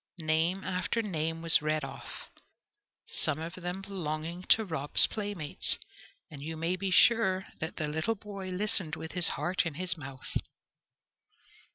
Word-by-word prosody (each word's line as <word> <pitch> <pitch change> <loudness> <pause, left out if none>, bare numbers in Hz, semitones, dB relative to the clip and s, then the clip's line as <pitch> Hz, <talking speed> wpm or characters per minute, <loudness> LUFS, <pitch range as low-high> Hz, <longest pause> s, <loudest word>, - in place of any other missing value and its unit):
Name 165 +3 +1
after 185 +5 -1
name 165 -4 -2
was 165 -1 +5
read 155 0 0
off, 135 - -8 0.7
some 155 - 0
of 165 +2 -5
them 185 +1 -5
belonging 170 -3 -4
to 220 - +5
Rob's 155 -5 +4
playmates, 205 -8 +1 0.5
and 145 -2 -9
you 160 +2 -5
may 165 +3 0
be 195 +1 -2
sure 190 -1 +4
that 160 - -4
the 155 - -2
little 160 +9 0
boy 200 -2 -7
listened 185 -3 0
with 160 - -7
his 180 -2 +4
heart 180 +1 +1
in 165 -4 -4
his 180 +1 -2
mouth. 135 -3 -5
170 Hz, 150 wpm, -31 LUFS, 155-190 Hz, 0.7 s, was